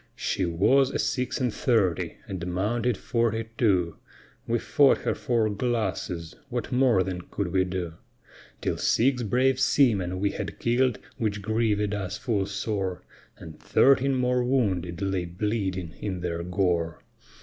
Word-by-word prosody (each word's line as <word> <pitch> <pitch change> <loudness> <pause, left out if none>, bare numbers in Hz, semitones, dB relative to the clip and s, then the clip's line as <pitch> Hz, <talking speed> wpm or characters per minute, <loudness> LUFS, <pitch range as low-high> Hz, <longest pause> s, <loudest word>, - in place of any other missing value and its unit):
She 95 - -1
was 115 +11 +3
a - - -2
six 125 -1 -1
and 125 -4 0
thirty, 105 -8 +1
and 90 -3 -5
mounted 110 +6 0
forty 115 -1 -1
two, 90 -9 +1 0.5
We 120 0 +2
fought 140 +4 +4
her - - 0
four 115 -3 0
glasses, 100 -7 -2 0.2
what 120 0 -3
more 125 -7 +4
then 90 -1 -4
could 100 -3 -2
we 95 +1 +2
do; 90 -3 -4 0.7
Till - - -1
six 125 +1 +2
brave 130 +4 +2
seamen 100 -10 +2
we 100 +1 +1
had - - -5
kill'd, 120 0 +1 0.2
which 105 -3 -2
grievèd 105 -1 +1
us 95 -3 -3
full 105 -6 -1
sore, 100 -2 -3 0.3
And 80 - -11
thirteen 135 0 +4
more 125 -1 +1
wounded 100 -9 0
lay 95 -2 -1
bleeding 95 -2 -2
in 95 -4 -3
their 85 -1 -2
gore. 85 -2 -1
105 Hz, 145 wpm, -26 LUFS, 90-120 Hz, 0.7 s, fought